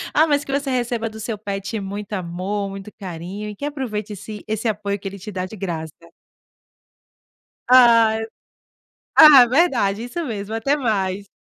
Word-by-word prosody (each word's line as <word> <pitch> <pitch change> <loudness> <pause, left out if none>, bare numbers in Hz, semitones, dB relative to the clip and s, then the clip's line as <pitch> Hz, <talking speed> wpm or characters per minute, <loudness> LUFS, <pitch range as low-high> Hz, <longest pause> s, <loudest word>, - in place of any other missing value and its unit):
ah, 310 - +6
mas 290 -1 +1
que - - -7
você 280 0 -1
receba 240 -2 -1
do 220 0 -11
seu 220 0 -4
pet 200 +1 -4
muito 200 +1 -6
amor, 190 +2 -3
muito 195 +1 -9
carinho, 190 +3 -6
e 210 - -8
que 285 - -6
aproveite 235 -8 -4
esse 210 +1 -9
esse 220 +2 -2
apoio 205 -2 -2
que 195 - -7
ele 195 +1 -7
te 210 +3 -8
dá 185 -2 -3
de 190 - -9
graça. 165 -6 -5 1.8
Ai 230 -3 +6 0.9
Ah, 290 -5 +10
verdade, 235 - +2
isso 335 +8 -4
mesmo. 215 -4 -5
Até 275 +6 +1
mais. 200 -7 -1
210 Hz, 165 wpm, -21 LUFS, 195-245 Hz, 1.8 s, Ah